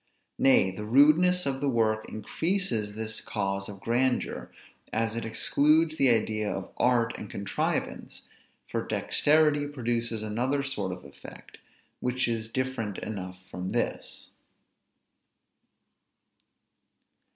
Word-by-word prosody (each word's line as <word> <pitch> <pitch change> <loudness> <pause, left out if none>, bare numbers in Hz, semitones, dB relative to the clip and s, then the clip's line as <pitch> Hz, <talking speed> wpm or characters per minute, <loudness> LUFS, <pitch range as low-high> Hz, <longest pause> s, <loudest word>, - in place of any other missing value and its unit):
Nay, 130 -8 +5
the 105 +3 -7
rudeness 155 +10 +5
of 135 -1 -1
the 140 - +1
work 110 -3 +1
increases 115 - -2
this 110 0 -3
cause 100 0 -3
of 100 -1 -9
grandeur, 125 +4 0 0.4
as 115 0 -1
it 115 - -3
excludes 155 +7 +3
the 135 -4 +4
idea 110 -2 +1
of - - -5
art 120 -1 +2
and 105 - -8
contrivance; 100 0 -3 0.4
for - - -2
dexterity 150 -1 +2
produces 120 -5 -2
another 125 +6 -1
sort 105 -9 -3
of 90 - -8
effect, 70 - -13 0.4
which 125 0 0
is 115 -1 -2
different 130 -5 -3
enough 95 -3 -6
from 90 +1 -4
this. - - -3
115 Hz, 115 wpm, -28 LUFS, 105-140 Hz, 0.4 s, Nay